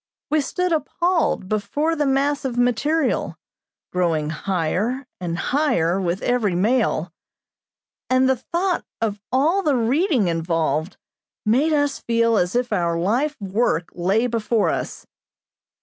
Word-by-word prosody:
We 310 Hz, 0 st, +3 dB
stood 360 Hz, +5 st, -2 dB
appalled 335 Hz, -, 0 dB
before 215 Hz, +11 st, -1 dB
the 295 Hz, -2 st, 0 dB
mass 280 Hz, +2 st, +1 dB
of 255 Hz, -3 st, -3 dB
material, 250 Hz, +5 st, +1 dB, 0.5 s
growing 165 Hz, -4 st, 0 dB
higher 195 Hz, -, -1 dB
and 170 Hz, -2 st, -3 dB
higher 195 Hz, -, +1 dB
with 180 Hz, +1 st, -2 dB
every 230 Hz, -7 st, +1 dB
mail, 195 Hz, -5 st, +1 dB, 1.0 s
and 255 Hz, 0 st, +4 dB
the 265 Hz, -, +3 dB
thought 345 Hz, -, -1 dB, 0.2 s
of 210 Hz, -3 st, -2 dB
all 310 Hz, +10 st, +2 dB
the 300 Hz, -7 st, +1 dB
reading 255 Hz, -, +2 dB
involved 165 Hz, -1 st, -1 dB, 0.5 s
made 260 Hz, +9 st, +3 dB
us 290 Hz, -2 st, +1 dB
feel 230 Hz, 0 st, +1 dB
as 180 Hz, +2 st, 0 dB
if 245 Hz, -2 st, 0 dB
our 170 Hz, -3 st, 0 dB
lifework 210 Hz, -, 0 dB
lay 195 Hz, +7 st, +1 dB
before 230 Hz, -2 st, +1 dB
us. -, -, -4 dB
230 Hz, 125 wpm, -22 LUFS, 180-285 Hz, 1.0 s, and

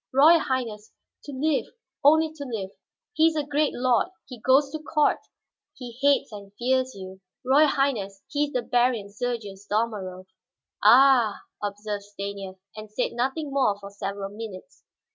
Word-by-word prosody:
"Royal 310 Hz, +6 st, +7 dB
Highness, 230 Hz, -7 st, -3 dB, 0.3 s
to 290 Hz, -, -7 dB
live, 285 Hz, +2 st, 0 dB, 0.4 s
only 315 Hz, +2 st, +5 dB
to 300 Hz, -2 st, -7 dB
live. 220 Hz, -8 st, -5 dB, 0.4 s
He 320 Hz, -5 st, +4 dB
is 325 Hz, -, 0 dB
a 300 Hz, -, 0 dB
great 290 Hz, +1 st, +1 dB
lord, 250 Hz, +2 st, +2 dB, 0.2 s
he 250 Hz, -3 st, -10 dB
goes 275 Hz, +3 st, +4 dB
to 310 Hz, -, -4 dB
court; 310 Hz, -1 st, +1 dB, 0.6 s
he 245 Hz, -2 st, -8 dB
hates 280 Hz, -2 st, +3 dB
and 200 Hz, -2 st, -10 dB
fears 260 Hz, +1 st, 0 dB
you. 190 Hz, 0 st, -10 dB, 0.2 s
Royal 285 Hz, +4 st, +5 dB
Highness, 220 Hz, -9 st, -1 dB
he 295 Hz, 0 st, 0 dB
is 290 Hz, -, -9 dB
the 250 Hz, -, 0 dB
Baron 240 Hz, -4 st, +1 dB
Sergius 210 Hz, -3 st, -5 dB
Dalmorov." 205 Hz, -4 st, -2 dB, 0.6 s
"Ah," 240 Hz, -1 st, +6 dB, 0.2 s
observed 205 Hz, 0 st, -4 dB
Stanief, 200 Hz, -1 st, -7 dB, 0.2 s
and 215 Hz, 0 st, -9 dB
said 210 Hz, -, -2 dB
nothing 265 Hz, +5 st, -2 dB
more 260 Hz, -7 st, +2 dB
for 200 Hz, 0 st, -10 dB
several 200 Hz, 0 st, -5 dB
minutes. 210 Hz, -4 st, -9 dB
240 Hz, 155 wpm, -25 LUFS, 205-275 Hz, 0.6 s, Royal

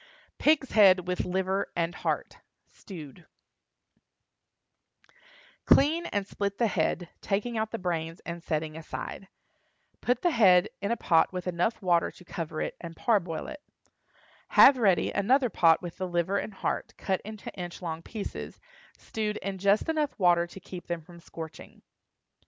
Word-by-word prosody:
PIG'S 295 Hz, -3 st, +3 dB
HEAD 195 Hz, -4 st, +6 dB
WITH 180 Hz, 0 st, -1 dB
LIVER 190 Hz, +1 st, -1 dB
AND 170 Hz, 0 st, 0 dB
HEART -, -, -3 dB, 0.3 s
(Stewed). 170 Hz, -3 st, -11 dB, 2.4 s
Clean 320 Hz, +5 st, +4 dB
and 205 Hz, -1 st, -2 dB
split 200 Hz, 0 st, -3 dB
the 235 Hz, -, +2 dB
head, 175 Hz, -3 st, 0 dB
taking 215 Hz, +4 st, -1 dB
out 220 Hz, 0 st, -1 dB
the 230 Hz, -, -4 dB
brains 165 Hz, -3 st, -3 dB
and 170 Hz, 0 st, -6 dB
setting 155 Hz, -1 st, -2 dB
aside. 165 Hz, +4 st, -7 dB, 0.7 s
Put 245 Hz, 0 st, 0 dB
the 350 Hz, -, +3 dB
head 190 Hz, -, +5 dB
in 200 Hz, -, -1 dB
a 235 Hz, -, 0 dB
pot 165 Hz, -2 st, +3 dB
with 180 Hz, -1 st, -5 dB, 0.4 s
water 175 Hz, -2 st, +3 dB
enough -, -, -10 dB
to 180 Hz, -, -15 dB
cover 160 Hz, -2 st, -5 dB
it -, -, -3 dB
and 165 Hz, -1 st, -8 dB
parboil 175 Hz, -6 st, 0 dB
it. 300 Hz, -1 st, -8 dB, 0.9 s
Have 265 Hz, -1 st, +7 dB
ready 190 Hz, -7 st, +3 dB
another 250 Hz, +4 st, +2 dB
pot 165 Hz, 0 st, +4 dB
with 175 Hz, -2 st, -7 dB
the 185 Hz, -, -3 dB
liver 175 Hz, +3 st, 0 dB
and 210 Hz, -, -6 dB
heart, -, -, -3 dB
cut 190 Hz, -1 st, -1 dB
into 215 Hz, 0 st, -8 dB
inch 175 Hz, -1 st, -7 dB
long 165 Hz, -2 st, -5 dB
pieces, 215 Hz, +3 st, -7 dB, 0.4 s
stewed 215 Hz, -1 st, -3 dB
in 195 Hz, 0 st, -5 dB
just 200 Hz, -, +3 dB
enough 310 Hz, -3 st, -1 dB
water 175 Hz, -2 st, +3 dB
to 185 Hz, -, -11 dB
keep 180 Hz, -1 st, -10 dB
them 170 Hz, -1 st, -3 dB
from 170 Hz, +2 st, -15 dB
scorching. 160 Hz, -1 st, -10 dB
185 Hz, 155 wpm, -28 LUFS, 170-215 Hz, 2.4 s, Have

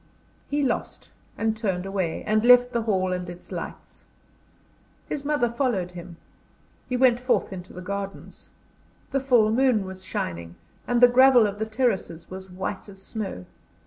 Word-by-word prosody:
He 290 Hz, 0 st, 0 dB
lost, 250 Hz, -3 st, -3 dB, 0.3 s
and 225 Hz, 0 st, 0 dB
turned 195 Hz, -5 st, -2 dB
away, 190 Hz, -4 st, -2 dB
and 215 Hz, 0 st, +1 dB
left 245 Hz, 0 st, +7 dB
the 235 Hz, -, +1 dB
hall 190 Hz, -4 st, 0 dB
and 180 Hz, -1 st, -4 dB
its 175 Hz, 0 st, -11 dB
lights. -, -, -8 dB, 1.0 s
His 280 Hz, -, -4 dB
mother 290 Hz, -4 st, +1 dB
followed 235 Hz, -7 st, -1 dB
him. 175 Hz, -1 st, -10 dB, 0.7 s
He 250 Hz, -, 0 dB
went 245 Hz, -2 st, +4 dB
forth 250 Hz, -5 st, 0 dB
into 185 Hz, -1 st, -9 dB
the 180 Hz, -, -9 dB
gardens. 200 Hz, +1 st, -6 dB, 0.6 s
The 275 Hz, -, +1 dB
full 245 Hz, -5 st, +3 dB
moon 240 Hz, -4 st, +2 dB
was 190 Hz, 0 st, -8 dB
shining, 85 Hz, -, -4 dB, 0.3 s
and 245 Hz, 0 st, +1 dB
the 245 Hz, -, +10 dB
gravel 250 Hz, -1 st, +6 dB
of 205 Hz, 0 st, -3 dB
the 220 Hz, -, -2 dB
terraces 215 Hz, -9 st, -1 dB
was 190 Hz, 0 st, -8 dB
white 190 Hz, +2 st, -5 dB
as 195 Hz, -1 st, -13 dB
snow. 190 Hz, -, -6 dB
215 Hz, 160 wpm, -25 LUFS, 185-245 Hz, 1.0 s, the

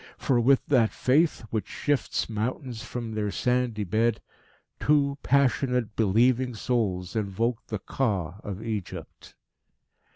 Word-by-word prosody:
For 125 Hz, -3 st, +2 dB
with 130 Hz, +3 st, +4 dB
that 120 Hz, -6 st, +3 dB
faith 145 Hz, -1 st, +2 dB
which 110 Hz, -2 st, -2 dB
shifts 145 Hz, -7 st, -1 dB
mountains 115 Hz, +2 st, -3 dB
from 120 Hz, -2 st, -5 dB
their 105 Hz, -1 st, -1 dB
sandy 125 Hz, -1 st, 0 dB
bed, 110 Hz, +4 st, +1 dB, 0.6 s
two 140 Hz, -1 st, +2 dB
passionate, 125 Hz, -4 st, +1 dB
believing 120 Hz, +4 st, +2 dB
souls 105 Hz, -6 st, -1 dB
invoked 110 Hz, +3 st, -1 dB
the 110 Hz, -, -3 dB
Ka 95 Hz, -5 st, -2 dB
of 100 Hz, +1 st, -6 dB
Egypt. 110 Hz, -5 st, -6 dB
115 Hz, 120 wpm, -27 LUFS, 105-130 Hz, 0.6 s, with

